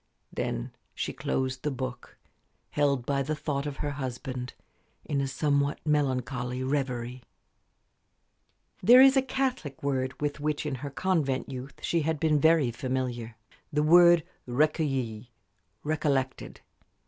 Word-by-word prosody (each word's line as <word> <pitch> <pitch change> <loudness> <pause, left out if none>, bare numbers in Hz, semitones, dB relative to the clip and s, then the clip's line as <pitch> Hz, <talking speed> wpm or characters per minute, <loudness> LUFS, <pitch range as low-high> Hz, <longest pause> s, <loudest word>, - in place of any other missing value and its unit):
Then - - -3 0.2
she - - -3
closed 130 -1 -2
the 150 - -1
book, 130 -2 -6 0.5
held 140 -4 +1
by 140 0 0
the 150 +3 -1
thought 145 -1 -2
of 140 -2 -5
her 145 - -2
husband 130 -2 -5 0.5
in 140 -2 0
a 135 - -1
somewhat 140 +1 0
melancholy 130 -4 0
reverie. 130 -3 -2 1.6
There 240 +7 +8
is 270 +1 +8
a 270 - +5
Catholic 255 - -2
word 130 -2 -1
with 145 0 -2
which 150 +1 -1
in 150 - -2
her 145 - -4
convent 140 -4 0
youth 130 +1 -7
she 170 - +1
had 160 0 -1
been 155 -1 +3
very 160 -4 +4
familiar 120 -2 -3 0.4
the 150 0 +1
word 170 +1 +7 0.2
recueilli 130 -4 0 0.6
"recollected." 145 -4 -1
140 Hz, 130 wpm, -28 LUFS, 130-150 Hz, 1.6 s, There